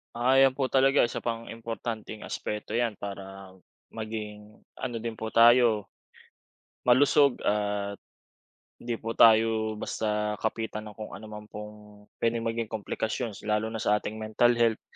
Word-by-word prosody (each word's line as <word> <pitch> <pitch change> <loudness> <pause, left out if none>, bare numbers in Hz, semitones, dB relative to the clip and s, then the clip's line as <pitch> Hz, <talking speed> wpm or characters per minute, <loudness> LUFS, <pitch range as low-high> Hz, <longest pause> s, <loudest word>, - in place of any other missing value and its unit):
Ayan 130 +3 +5
po, 130 0 -1
talaga 135 -1 +4
isa - - -6
pang 115 -1 -3
importanteng 115 -1 -6
aspeto 105 +1 -4
‘yan 115 -4 0
para 95 -1 -8 0.4
maging 105 -1 -7 0.2
ano 120 -2 -4
din 115 0 -4
po 110 0 -5
tayo 115 -3 +5 1.0
malusog 140 +2 +5
at 100 -1 -1 0.8
hindi 120 -1 -3
po 115 +1 -4
tayo 110 -1 +4
basta 105 -1 -1
kapitan 110 -1 -3
ng 105 - -16
kung 110 - -7
ano 110 - -9
man 105 0 -9
pong 105 -1 -11
puwedeng 115 0 0
maging 115 0 -2
komplikasyons 110 +1 -4
lalo 105 +1 0
na 110 - -4
sa 105 - +2
ating 110 +1 -5
mental 115 +2 +2
health. 115 -2 +2
110 Hz, 140 wpm, -28 LUFS, 105-115 Hz, 1.0 s, Ayan